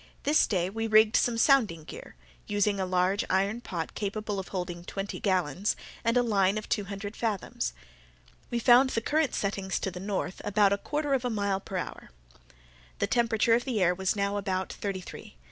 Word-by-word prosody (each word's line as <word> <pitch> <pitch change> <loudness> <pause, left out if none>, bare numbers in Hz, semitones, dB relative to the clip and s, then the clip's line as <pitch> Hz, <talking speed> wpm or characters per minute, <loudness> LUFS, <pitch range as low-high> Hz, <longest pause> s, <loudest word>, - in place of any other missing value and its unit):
This 295 +2 +4
day 180 -4 0
we 225 +4 -3
rigged 215 0 +5
some 240 -2 +2
sounding 225 - +3
gear, - - -10 0.3
using 205 -1 +1
a 190 - -1
large 185 +2 +1
iron 200 +5 +1
pot 170 -8 -5
capable 205 0 -3
of 190 - -6
holding 180 -2 -4
twenty 195 +2 -5
gallons, 185 -1 0 0.3
and 230 +1 +2
a 245 - +4
line 200 -3 +2
of 215 - -5
two 205 - 0
hundred 200 +1 -6
fathoms. 200 - -2 0.8
We 240 - -1
found 245 +2 +6
the 230 - -1
current 300 +3 +1
setting 195 -1 -2
to 190 - -1
the 180 - -7
north, 195 -1 -3
about 205 -1 +3
a 200 - -1
quarter 295 +2 -2
of 265 -2 +1
a 250 - 0
mile 200 -3 0
per 195 -1 -6
hour. - - -6 0.9
The - - +1
temperature 230 -1 +2
of 240 +1 +3
the 250 -5 -1
air 180 -1 +4
was 190 +2 -1
now 200 0 0
about 190 -2 -2
thirty 195 -2 -4
three. - - -11
200 Hz, 195 wpm, -28 LUFS, 190-225 Hz, 0.9 s, found